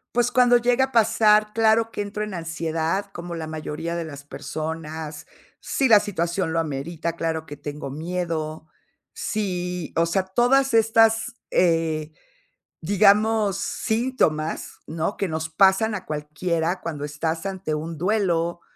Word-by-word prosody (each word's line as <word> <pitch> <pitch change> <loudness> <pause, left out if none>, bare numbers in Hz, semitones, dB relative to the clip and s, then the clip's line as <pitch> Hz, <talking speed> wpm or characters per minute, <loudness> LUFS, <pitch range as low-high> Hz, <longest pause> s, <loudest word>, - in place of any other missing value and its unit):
Pues, 245 0 +2
cuando 245 0 +5
llega 245 +2 +3
a 265 - -15
pasar, 215 -1 +4
claro 225 0 +3
que - - -8
entro 210 +1 -4
en 210 -2 -5
ansiedad, 165 +2 -2
como 175 -2 -6
la 160 -1 -5
mayoría 155 +2 -4
de 165 - -3
las 145 -2 -9
personas. 155 +1 -6 0.3
Si 265 -3 0
la 210 -2 +8
situación 175 -3 -2
lo 165 - +2
amerita, 165 +3 -4
claro 160 -1 -2
que 145 0 -9
tengo 145 -1 -6
miedo. 160 -1 -3 0.5
Si, 180 -5 -3
o 165 - +4
sea, 185 +3 +1
todas 245 +7 +2
estas, 225 +1 +4 0.2
eh, 160 -3 +1 0.7
digamos, 205 +2 +3
síntomas, 220 -10 -1
¿no?, 165 +5 -2
que 195 - -1
nos 160 0 -3
pasan 195 +5 +4
a 190 -3 -5
cualquiera, 160 +3 -2
cuando 150 -3 -4
estás 160 +4 -3
ante 190 -5 -3
un 160 0 -5
duelo, 175 -4 0
170 Hz, 140 wpm, -24 LUFS, 160-210 Hz, 0.7 s, la